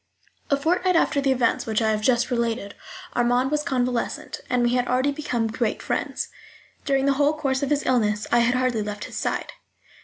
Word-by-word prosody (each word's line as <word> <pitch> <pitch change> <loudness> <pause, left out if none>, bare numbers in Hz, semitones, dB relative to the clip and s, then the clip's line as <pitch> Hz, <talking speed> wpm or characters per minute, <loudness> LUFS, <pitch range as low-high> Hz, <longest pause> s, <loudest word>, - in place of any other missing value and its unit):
A 280 - +3
fortnight 360 +5 +1
after 295 -3 +2
the 275 -1 +2
events 250 -3 +1
which 220 -1 +1
I 220 -1 +2
have 215 0 -1
just 240 +2 +2
related 230 -4 -1 0.4
Armand 245 +2 +2
was 300 0 +1
convalescent, 250 -5 -2
and 250 -1 +2
we 240 0 +2
had 250 0 +1
already 260 +3 +2
become 250 -6 -2
great 225 0 -1
friends. - - -2 0.6
During 275 -1 +2
the 280 - +4
whole 295 +2 +3
course 270 -3 0
of 280 - -1
his 295 0 0
illness 215 -4 +1
I 240 - +5
had 235 +1 +3
hardly 255 -3 +1
left 210 0 -5
his - - -9
side. - - -2
250 Hz, 195 wpm, -24 LUFS, 235-280 Hz, 0.6 s, I